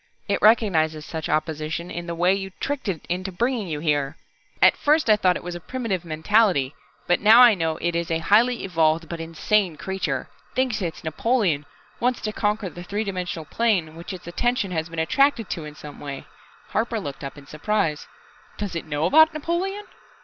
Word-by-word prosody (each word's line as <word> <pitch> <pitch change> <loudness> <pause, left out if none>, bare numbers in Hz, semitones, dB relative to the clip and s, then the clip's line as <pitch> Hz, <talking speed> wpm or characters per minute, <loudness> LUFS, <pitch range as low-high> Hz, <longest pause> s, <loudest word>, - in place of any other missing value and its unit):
It 200 - 0
recognizes 160 -9 +3
such 160 -1 -5
opposition 155 +2 -2
in 175 0 -5
the 170 - -3
way 175 +3 +3
you 195 0 -3
tricked 285 -4 -3
it 180 -6 -3
into 185 +2 -3
bringing 235 +2 -1
you 155 -3 -3
here. 145 -2 0 0.4
At - - +6
first 300 -5 +3
I - - +7
thought 185 -4 +2
it - - -5
was 175 0 -5
a 175 - -6
primitive 200 -1 -3
mentality, 160 -3 +2 0.3
but 175 - +2
now 215 +3 +7
I 240 -2 +8
know 165 -4 -1
it 170 0 -1
is 170 0 -1
a 165 - +1
highly 225 +9 +3
evolved, 165 -3 +1
but 170 +1 -6
insane 165 +2 0
creature, 190 +2 -3 0.3
thinks 255 -5 0
it's 170 -3 -4
Napoleon, 160 - 0 0.3
wants 250 +1 +1
to 215 - -2
conquer 210 -1 0
the 175 - -10
three 205 +4 -3
dimensional 180 -5 -4
plane 180 -5 0
which 170 +4 -8
its 185 -3 -8
attention 230 +3 -1
has 160 -1 -2
been 165 - -9
attracted 225 - +2
to 160 - -4
in 150 0 -9
some 150 -1 -10
way 140 -2 -7 0.2
" - - -27
Harper 225 +1 0
looked 145 -8 -7
up 140 +1 -6
in 140 - -12
surprise. 155 +1 -1 0.5
"Does 205 -4 -4
it 165 - -4
know 150 +1 -1
about 315 - +6
Napoleon?" 370 +6 -2
180 Hz, 195 wpm, -24 LUFS, 160-215 Hz, 0.5 s, I